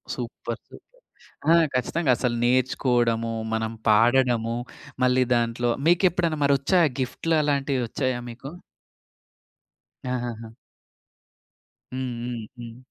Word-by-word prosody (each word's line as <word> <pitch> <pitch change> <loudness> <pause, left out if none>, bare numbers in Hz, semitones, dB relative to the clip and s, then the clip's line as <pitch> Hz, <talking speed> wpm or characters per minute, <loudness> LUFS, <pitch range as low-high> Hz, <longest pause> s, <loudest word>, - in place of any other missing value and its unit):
Super! - - -6
Super! - - -18 0.5
ఆ! - - +8 0.2
ఖచ్చితంగా 130 +4 0
అసలు 120 -2 0
నేర్చుకోవడము, 120 -2 +1 0.2
మనం 110 0 -1 0.2
పాడడము, 115 +1 +3 0.5
మళ్ళీ 125 0 +4
దాంట్లో 120 0 0 0.2
మీకెప్పుడన్న 175 -2 +2
మరి 140 0 +4
వచ్చాయా 170 +3 +3
గిఫ్ట్‌ల 130 +6 -2
అలాంటివొచ్చాయా 135 -3 -1
మీకు? 125 +4 -9 1.6
ఆహాహా! 120 -2 -4 1.4
హ్మ్. 130 -1 -3
హ్మ్. 120 -1 -4 0.2
హ్మ్. 115 0 -9
125 Hz, 95 wpm, -25 LUFS, 120-140 Hz, 1.6 s, ఆ